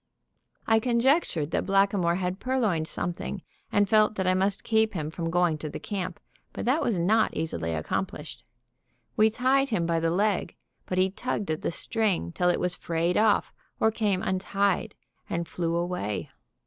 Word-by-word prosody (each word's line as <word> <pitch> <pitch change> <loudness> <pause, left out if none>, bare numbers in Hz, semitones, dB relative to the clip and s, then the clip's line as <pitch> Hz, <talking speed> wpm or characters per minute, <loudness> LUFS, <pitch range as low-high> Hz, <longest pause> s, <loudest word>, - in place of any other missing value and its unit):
I 225 0 +4
conjectured 235 - +2
that - - -1
Blackamoor 195 -3 +3
had 180 +1 -2
purloined 215 -12 0
something, 175 +3 -4 0.3
and 205 0 +3
felt 215 +1 +4
that 190 - -1
I 185 - +3
must 190 +1 0
keep 220 -1 +2
him 155 -2 -3
from 165 0 -3
going 175 -2 +2
to 155 - -5
the - - -6
camp; 185 -4 -4 0.3
but - - -5
that 270 +7 +2
was 225 -6 0
not 215 +6 +2
easily 85 - -2
accomplished. 80 - -4 0.7
We 215 +1 +5
tied 265 +4 +2
him 195 -8 0
by 165 0 +1
the 165 0 +1
leg, 195 0 0 0.3
but 185 - -2
he 185 0 +3
tugged 205 -4 -3
at 155 - -2
the - - -1
string 195 - -1
till 180 - +1
it 175 - +1
was 180 0 0
frayed 170 +1 -1
off 215 -1 +3 0.3
or 220 - +3
came 205 -4 0
untied, 195 +1 0 0.3
and 170 0 -2
flew 170 -1 -2
away. 105 - -2
185 Hz, 175 wpm, -27 LUFS, 170-215 Hz, 0.7 s, We